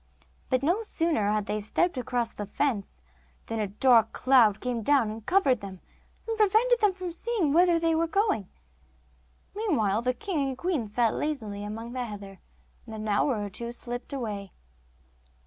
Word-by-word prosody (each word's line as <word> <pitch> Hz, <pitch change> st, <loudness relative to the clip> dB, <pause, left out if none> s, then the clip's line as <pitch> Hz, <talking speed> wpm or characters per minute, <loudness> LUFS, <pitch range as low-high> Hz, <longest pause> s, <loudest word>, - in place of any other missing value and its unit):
But 255 Hz, +1 st, +1 dB
no 350 Hz, +9 st, +2 dB
sooner 325 Hz, -, 0 dB
had 210 Hz, -1 st, 0 dB
they 210 Hz, -, -2 dB
stepped 345 Hz, -, 0 dB
across 245 Hz, -2 st, -1 dB
the 205 Hz, -, -6 dB
fence, 220 Hz, -3 st, -2 dB, 0.4 s
than 225 Hz, -1 st, -4 dB
a 210 Hz, -, 0 dB
dark 225 Hz, +2 st, +4 dB
cloud 235 Hz, -6 st, +4 dB
came 245 Hz, -1 st, -2 dB
down 255 Hz, -2 st, +3 dB
and 220 Hz, 0 st, -8 dB
covered 275 Hz, -, +2 dB
them, 190 Hz, -2 st, -8 dB, 0.5 s
and 455 Hz, -, -1 dB
prevented 440 Hz, +4 st, +4 dB
them 375 Hz, -4 st, 0 dB
seeing 355 Hz, -4 st, -1 dB
whither 345 Hz, +1 st, +5 dB
they 330 Hz, 0 st, +1 dB
were 330 Hz, +1 st, +1 dB
going. 395 Hz, -, 0 dB, 1.1 s
Meanwhile 230 Hz, -, +1 dB
the 250 Hz, +1 st, 0 dB
king 380 Hz, -5 st, -2 dB
and 270 Hz, -2 st, -2 dB
queen 325 Hz, -10 st, -1 dB
sat 230 Hz, +1 st, +1 dB
lazily 220 Hz, -10 st, -3 dB
among 225 Hz, +3 st, -6 dB
the 255 Hz, -1 st, -2 dB
heather, 200 Hz, -3 st, -9 dB, 0.5 s
and 220 Hz, -, -7 dB
an 215 Hz, 0 st, -5 dB
hour 210 Hz, +2 st, +1 dB
or 205 Hz, -, -4 dB
two 235 Hz, +5 st, -5 dB
slipped 245 Hz, +1 st, -6 dB
away. 210 Hz, -8 st, -5 dB
250 Hz, 165 wpm, -27 LUFS, 215-335 Hz, 1.1 s, whither